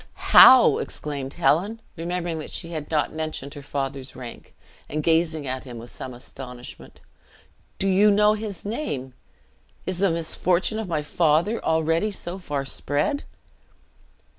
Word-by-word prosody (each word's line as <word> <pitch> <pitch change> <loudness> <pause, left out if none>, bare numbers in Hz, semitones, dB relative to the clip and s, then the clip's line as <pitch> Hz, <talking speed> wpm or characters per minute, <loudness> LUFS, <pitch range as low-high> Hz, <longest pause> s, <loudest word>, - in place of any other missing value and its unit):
"How!" 255 -2 +9
exclaimed 140 -3 -5
Helen, 185 +6 +1 0.2
remembering 170 0 -3
that 155 - -7
she 170 - -5
had 155 -3 -6
not 155 -2 +1
yet - - -15
mentioned 155 -3 -4
her 145 - -9
father's 135 -1 -4
rank, 125 -2 -10 0.3
and 155 +1 -2
gazing 160 -2 +1
at 130 0 -4
him 125 -3 -9
with 115 +1 -10
astonishment; 125 0 -9 0.8
"do 195 - 0
you 195 +2 +5
know 210 +1 +4
his 210 -4 -5
name 145 - -4 0.7
is 185 -1 -2
the 195 0 +3
misfortune 175 +5 0
of 220 - -4
my 155 -4 -1
father 165 +8 +1
already 160 +5 +1
so 185 -2 -5
far 145 -6 -3
spread?" 145 - -1
160 Hz, 140 wpm, -24 LUFS, 140-185 Hz, 0.8 s, How